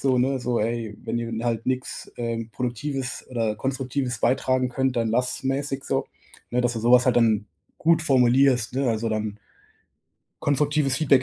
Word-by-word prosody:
so, 130 Hz, -2 st, +2 dB
ne, 130 Hz, +2 st, +1 dB
so: 120 Hz, -2 st, -1 dB
„Ey, 115 Hz, -1 st, -2 dB
wenn 120 Hz, -, -2 dB
ihr 115 Hz, 0 st, -4 dB
halt 115 Hz, -1 st, -1 dB
nix, 130 Hz, 0 st, -3 dB
ähm, 115 Hz, -1 st, -3 dB
Produktives 125 Hz, +3 st, -3 dB
oder 115 Hz, -4 st, -1 dB
Konstruktives 130 Hz, -1 st, -2 dB
beitragen 130 Hz, 0 st, +2 dB
könnt, 130 Hz, 0 st, -1 dB
dann 115 Hz, -1 st, +1 dB
lasst's”, 125 Hz, +3 st, 0 dB
mäßig 135 Hz, 0 st, -2 dB
so, 135 Hz, -, -1 dB, 0.4 s
ne, 125 Hz, +1 st, +1 dB
dass 120 Hz, -1 st, +1 dB
du -, -, -2 dB
so 120 Hz, +2 st, +3 dB
was 125 Hz, 0 st, +7 dB
halt 125 Hz, -, +3 dB
dann 110 Hz, -3 st, +3 dB, 0.3 s
gut 165 Hz, 0 st, +3 dB
formulierst, 130 Hz, -2 st, +3 dB
ne? 135 Hz, -1 st, +1 dB
Also, 115 Hz, 0 st, 0 dB
dann 110 Hz, -1 st, -3 dB, 1.0 s
„konstruktives 145 Hz, -1 st, +2 dB
Feedback 135 Hz, -4 st, +4 dB
125 Hz, 170 wpm, -24 LUFS, 115-135 Hz, 1.0 s, was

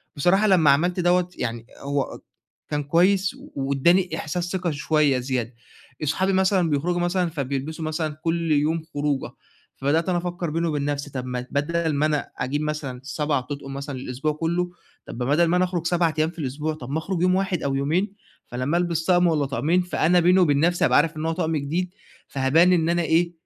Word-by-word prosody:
بصراحة 185 Hz, +8 st, +3 dB
لمّا 175 Hz, -7 st, +5 dB
عملت 175 Hz, +6 st, +1 dB
دوّة 180 Hz, 0 st, +2 dB
يعني 115 Hz, -1 st, -3 dB
هو 140 Hz, -1 st, -3 dB, 0.5 s
كان 150 Hz, -1 st, -1 dB
كويس 185 Hz, +6 st, +2 dB, 0.2 s
وادّاني 140 Hz, +7 st, +2 dB
احساس 175 Hz, +3 st, -3 dB
ثقة 180 Hz, -3 st, -1 dB
شوية 145 Hz, -2 st, +2 dB
زيادة. 125 Hz, -2 st, -2 dB, 0.5 s
أصحابي 185 Hz, +6 st, +1 dB
مثلًا 190 Hz, -2 st, +2 dB
بيخرجوا 165 Hz, +5 st, 0 dB
مثلًا 175 Hz, 0 st, +1 dB
فبيلبسوا 145 Hz, +1 st, -4 dB
مثلًا 155 Hz, 0 st, -2 dB
كل 165 Hz, -1 st, 0 dB
يوم 155 Hz, +2 st, +1 dB
خروجه، 145 Hz, -1 st, -1 dB, 0.4 s
فبدأت 155 Hz, +6 st, 0 dB
أنا 180 Hz, -, +2 dB
أفكر 175 Hz, -1 st, -3 dB
بيني 165 Hz, +2 st, -1 dB
وبين 145 Hz, -3 st, -1 dB
نفسي 145 Hz, 0 st, -2 dB
طب 130 Hz, -2 st, -4 dB
ما 125 Hz, -1 st, -4 dB
بدل 160 Hz, +2 st, 0 dB
ما 145 Hz, +2 st, +1 dB
أنا 150 Hz, -1 st, -1 dB
أجيب 135 Hz, +4 st, -2 dB
مثلًا 150 Hz, -4 st, -3 dB
7 150 Hz, 0 st, -1 dB
أطقم 135 Hz, +1 st, -7 dB
مثلًا 140 Hz, 0 st, -5 dB
للأسبوع 130 Hz, +4 st, -2 dB
كلّه، 170 Hz, +3 st, -1 dB, 0.3 s
طب -, -, -8 dB
بدل 145 Hz, +7 st, +2 dB
ما 170 Hz, +2 st, +2 dB
أنا 180 Hz, -, +3 dB
أخرج 175 Hz, -2 st, -3 dB
7 170 Hz, -2 st, +2 dB
أيام 155 Hz, +1 st, +2 dB
في 170 Hz, -, -12 dB
الأسبوع 150 Hz, +2 st, -2 dB
طب 125 Hz, -5 st, -9 dB
ما 145 Hz, -, -1 dB
اخرج 175 Hz, +1 st, -3 dB
يوم 185 Hz, 0 st, +3 dB
واحد 190 Hz, -3 st, -1 dB
أو 135 Hz, -1 st, 0 dB
يومين، 165 Hz, +9 st, 0 dB, 0.3 s
فلمّا 130 Hz, +7 st, -1 dB
ألبس 170 Hz, -2 st, -1 dB
طقم 175 Hz, 0 st, +4 dB
والّا 155 Hz, -4 st, +1 dB
طقمين 155 Hz, +6 st, +1 dB
فأنا 180 Hz, 0 st, +2 dB
بيني 180 Hz, +2 st, +4 dB
وبين 145 Hz, -6 st, +3 dB
نفسي 175 Hz, +3 st, +2 dB
أبقى -, -, +4 dB
عارف 160 Hz, +1 st, +2 dB
إن 155 Hz, -, -3 dB
هو 165 Hz, -, +1 dB
طقم 160 Hz, 0 st, -1 dB
جديد، 170 Hz, +6 st, -2 dB, 0.3 s
فهبان 150 Hz, +7 st, +3 dB
إن 165 Hz, -2 st, +2 dB
أنا 175 Hz, 0 st, +2 dB
إيه 170 Hz, +1 st, +2 dB
160 Hz, 190 wpm, -24 LUFS, 140-175 Hz, 0.5 s, لمّا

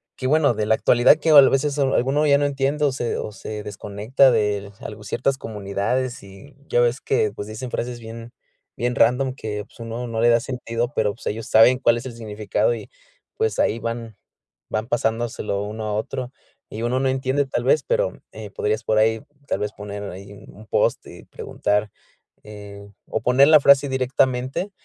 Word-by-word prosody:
que 130 Hz, -, -3 dB
bueno, 150 Hz, -2 st, +3 dB
de 105 Hz, -1 st, -2 dB
la 110 Hz, -, +4 dB
actualidad 120 Hz, +6 st, +4 dB
que 160 Hz, 0 st, +1 dB
o -, -, +9 dB
a 135 Hz, -, +9 dB
veces 140 Hz, +2 st, 0 dB
alguno 135 Hz, +2 st, +2 dB
ya 140 Hz, -1 st, +5 dB
no 145 Hz, -, +1 dB
entiende 140 Hz, +2 st, 0 dB
o 140 Hz, -, +2 dB
se 120 Hz, -3 st, -3 dB
o 105 Hz, -, -5 dB
se 105 Hz, 0 st, -7 dB
desconecta 105 Hz, +6 st, +1 dB
del 105 Hz, -3 st, 0 dB
algo 105 Hz, -1 st, -9 dB
ciertas 130 Hz, +6 st, -1 dB
comunidades 110 Hz, +4 st, -3 dB
y 100 Hz, +9 st, -14 dB
ya -, -, +1 dB
ves 120 Hz, +2 st, +1 dB
que, 110 Hz, -6 st, +1 dB
pues, 105 Hz, 0 st, -7 dB
dicen 110 Hz, +3 st, -7 dB
frases 120 Hz, 0 st, -4 dB
bien 115 Hz, +1 st, -10 dB, 0.5 s
bien 120 Hz, +1 st, -1 dB
random 130 Hz, +3 st, +2 dB
que, 105 Hz, -3 st, -5 dB
pues, -, -, -23 dB
uno 115 Hz, +1 st, -5 dB
no 115 Hz, -1 st, -3 dB
le 120 Hz, -, +5 dB
da 115 Hz, 0 st, +5 dB
sentido 120 Hz, 0 st, -4 dB
pero, 105 Hz, -2 st, +1 dB
pues, 115 Hz, -, -16 dB
ellos 110 Hz, +1 st, -4 dB
saben 115 Hz, +3 st, +6 dB
cuál 120 Hz, -3 st, +3 dB
es 120 Hz, -, -7 dB
el 130 Hz, -, -6 dB
significado, 110 Hz, -, -1 dB
y -, -, -8 dB, 0.5 s
pues, 450 Hz, 0 st, -1 dB
ahí 110 Hz, -, +2 dB
van 115 Hz, -1 st, -5 dB, 0.5 s
van 110 Hz, +1 st, -2 dB
pasándoselo 115 Hz, -4 st, -1 dB
uno 110 Hz, +1 st, -5 dB
a 105 Hz, -, -2 dB
otro, 125 Hz, +4 st, -4 dB, 0.4 s
y 110 Hz, -, -7 dB
uno 125 Hz, +2 st, 0 dB
no 135 Hz, -, +1 dB
entiende 130 Hz, +2 st, 0 dB
tal 130 Hz, -, -3 dB
vez 475 Hz, -, +3 dB
pero, -, -, -1 dB
eh, -, -, -9 dB
podrías 445 Hz, -1 st, -2 dB
por 110 Hz, -, +1 dB
ahí 110 Hz, 0 st, +2 dB, 0.3 s
tal -, -, -1 dB
vez 105 Hz, 0 st, -3 dB
poner 105 Hz, 0 st, -7 dB
ahí 100 Hz, +2 st, -11 dB
un -, -, -15 dB
un 110 Hz, -, -14 dB
post -, -, +1 dB
y -, -, -13 dB
preguntar, 105 Hz, 0 st, -2 dB, 0.5 s
eh, 100 Hz, -1 st, -11 dB, 0.2 s
o -, -, -2 dB
poner 130 Hz, +4 st, +5 dB
la 155 Hz, -1 st, +8 dB
frase 140 Hz, 0 st, +5 dB
directamente 130 Hz, +6 st, 0 dB
120 Hz, 200 wpm, -22 LUFS, 105-135 Hz, 0.5 s, o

